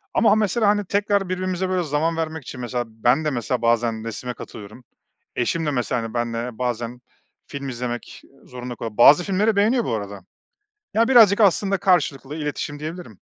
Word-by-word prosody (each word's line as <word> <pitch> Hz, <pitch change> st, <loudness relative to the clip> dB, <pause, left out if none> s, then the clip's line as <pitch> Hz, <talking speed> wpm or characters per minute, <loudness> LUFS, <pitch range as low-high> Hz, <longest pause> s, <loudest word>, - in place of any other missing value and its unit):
Ama 215 Hz, -2 st, +5 dB
mesela 215 Hz, +1 st, +1 dB
hani 205 Hz, 0 st, +2 dB
tekrar 200 Hz, 0 st, 0 dB
birbirimize 185 Hz, 0 st, -2 dB
böyle 185 Hz, -1 st, 0 dB
zaman 160 Hz, +2 st, -1 dB
vermek 160 Hz, -2 st, -3 dB
için 125 Hz, -, -8 dB
mesela 120 Hz, 0 st, -2 dB
ben 120 Hz, +7 st, +1 dB
de -, -, +2 dB
mesela 125 Hz, -2 st, -2 dB
bazen 115 Hz, -1 st, +1 dB
resme 125 Hz, +2 st, -5 dB
katılıyorum, 110 Hz, +1 st, -11 dB, 0.5 s
eşim 160 Hz, +7 st, -1 dB
de 150 Hz, -, 0 dB
mesela, 125 Hz, -2 st, -1 dB
hani, 115 Hz, -1 st, -6 dB
benle 120 Hz, 0 st, -3 dB
bazen 120 Hz, 0 st, -3 dB, 0.5 s
film 140 Hz, -1 st, -6 dB
izlemek 120 Hz, -1 st, -5 dB, 0.2 s
zorunda 125 Hz, -1 st, -7 dB
kalıyor. 115 Hz, -2 st, -7 dB
Bazı 145 Hz, +8 st, +7 dB
filmleri 200 Hz, +4 st, +1 dB
beğeniyor 220 Hz, +4 st, +2 dB
bu -, -, -2 dB
arada. 100 Hz, -2 st, -6 dB, 0.7 s
Ya, 230 Hz, +1 st, +3 dB
birazcık 225 Hz, -5 st, +6 dB
aslında 195 Hz, 0 st, +3 dB
karşılıklı 150 Hz, -7 st, +1 dB
iletişim 150 Hz, -1 st, -4 dB
diyebilirim. 155 Hz, -, -8 dB
145 Hz, 165 wpm, -22 LUFS, 120-185 Hz, 0.7 s, Bazı